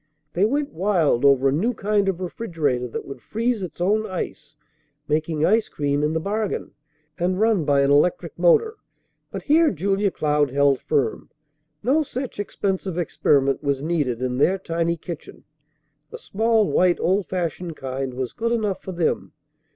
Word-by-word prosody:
They 185 +4 +3
went 280 +5 -1
wild 165 - +1
over 140 -1 +5
a - - +3
new 215 - 0
kind 205 -1 +1
of 185 -2 -2
refrigerator 165 - -2
that 115 - -6
would 135 -3 -9
freeze 230 - -1
its 180 -2 -7
own 210 +5 +1
ice, 155 -6 -6 0.5
making 155 +1 0
ice 220 +2 +2
cream 145 0 -1
in 150 +1 0
the 160 - 0
bargain, 205 +4 -3 0.5
and 185 +2 0
run 215 -7 +2
by 140 -1 +3
an 140 0 +3
electric 170 +3 +1
motor; 425 - +3 0.5
but - - -6
here 315 +2 +4
Julia 195 +3 0
Cloud 150 -4 +1
held 140 0 +2
firm. 140 -7 -1 0.5
No 275 +7 +3
such 260 -5 -5
expensive 190 -3 -2
experiment 140 -5 +1
was 140 -2 -1
needed 145 -7 -1
in 125 0 -1
their 185 +7 +3
tiny 170 -2 -1
kitchen. 165 -1 -9 0.7
A - - -7
small 220 0 +1
white, 180 -1 +3
old 190 +2 +1
fashioned 175 -2 -3
kind 130 -1 -4
was 130 -2 -4
good 230 +1 -2
enough 215 -5 -1
for 190 - -7
them. 170 -1 -1
175 Hz, 165 wpm, -23 LUFS, 145-205 Hz, 0.7 s, over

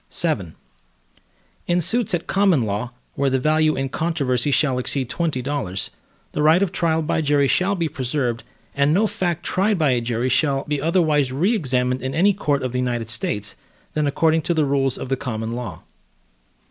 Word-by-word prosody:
VII 105 - -1 1.1
In 175 0 +2
suits 225 +3 +1
at 170 - -4
common 195 -9 +3
law, 105 +3 -2 0.2
where 140 0 +1
the 130 - +1
value 155 +3 +2
in 135 0 -1
controversy 145 -5 0
shall 135 -2 +2
exceed 130 0 -1
twenty 155 -7 -1
dollars, 125 -9 -3 0.4
the - - -2
right 160 +5 +5
of 190 - -1
trial 165 -4 0
by 160 +1 0
jury 145 -2 +2
shall 190 +7 +2
be 170 -3 -1
preserved, 130 -4 -2 0.3
and 140 +2 +2
no 210 +4 +3
fact 175 -5 -2
tried 195 +5 +1
by 155 -5 +2
a 125 -1 +1
jury 120 +1 -1
shall 135 +1 +1
be 150 -1 -2
otherwise 155 -5 +2
re 175 - +1
examined 125 - 0
in 130 +1 -3
any 195 +5 +4
court 145 -7 -1
of 130 - -2
the 125 - -2
United 120 -3 -2
States, 105 -3 -2 0.4
than 150 -1 0
according 160 +3 +2
to 170 +3 -1
the 155 -2 +2
rules 135 -2 +1
of - - -5
the 135 - +2
common 110 -3 -4
law. 120 0 -6
145 Hz, 185 wpm, -22 LUFS, 125-165 Hz, 1.1 s, right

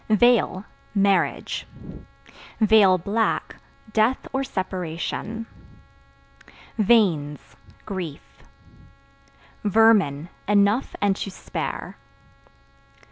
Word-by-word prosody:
Veil 220 -3 +3 0.3
Marriage; 200 -1 +1 1.4
(black) 220 +2 -1 0.4
death 225 +4 +1
or 270 +1 0
separation. 190 +2 -4 1.3
Veins 180 -10 +2 0.3
Grief. 180 -8 -7 1.2
Vermin 200 -8 +3 0.2
Enough 205 +4 +2
and 200 -1 +3
to - - -4
spare. 185 - -6
200 Hz, 60 wpm, -23 LUFS, 185-225 Hz, 1.4 s, Veil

